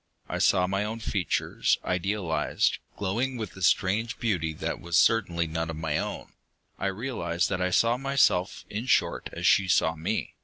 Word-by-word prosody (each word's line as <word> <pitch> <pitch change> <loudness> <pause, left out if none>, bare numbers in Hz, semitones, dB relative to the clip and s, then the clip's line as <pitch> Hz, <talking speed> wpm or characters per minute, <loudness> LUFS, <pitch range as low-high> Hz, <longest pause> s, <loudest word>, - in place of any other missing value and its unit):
I - - -3
saw 90 - +4
my 100 +2 -1
own 110 +2 -4
features, 100 -6 0
idealized, 90 -2 0 0.2
glowing 120 +7 -1
with 110 -5 -6
a 95 - -11
strange 105 +6 +1
beauty 90 -9 0
that - - -4
was 85 0 0
certainly 90 -6 +3
none 80 +1 -3
of 80 - -4
my 80 -1 -1
own. - - -5 0.5
I - - 0
realized 95 -5 -2
that 95 -1 -2
I 90 - +1
saw 115 +6 +3
myself, 135 -9 +1
in 110 +5 -5
short, - - +1
as - - -5
she 95 0 +5
saw 80 -2 +2
me. 80 - -3
95 Hz, 175 wpm, -27 LUFS, 85-110 Hz, 0.5 s, she